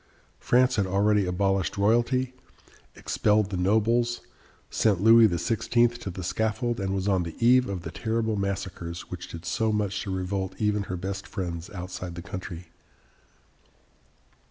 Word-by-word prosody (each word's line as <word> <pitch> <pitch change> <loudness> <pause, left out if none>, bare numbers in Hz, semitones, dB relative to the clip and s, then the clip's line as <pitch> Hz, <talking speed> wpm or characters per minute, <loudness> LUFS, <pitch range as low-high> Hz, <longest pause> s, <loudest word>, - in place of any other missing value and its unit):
France 125 0 +3
had 100 -2 +1
already 100 +1 +2
abolished 95 -1 0
royalty, 120 +5 +2 0.6
expelled 105 -1 +1
the - - -2
nobles, 110 +6 +1 0.5
sent 105 -5 +2
Louis 115 +2 +7
XVI. 115 +6 +1
to 100 - -5
the 95 0 -6
scaffold, 110 +5 -1
and 95 0 -1
was 95 0 -2
on 95 -3 +2
the 85 -2 -5
eve 125 +1 +4
of 95 -3 -4
the - - -6
terrible 110 -1 -1
massacres 95 -4 -4
which 90 -1 -6
did 85 +1 -9
so 110 +3 0
much 105 -2 -1
to - - -5
revolt 95 0 -2
even 105 -1 0
her 90 - -4
best 95 +2 -5
friends 85 -2 -5
outside 90 -2 -6
the 85 - -7
country. 90 -2 -7
100 Hz, 150 wpm, -26 LUFS, 90-110 Hz, 0.6 s, Louis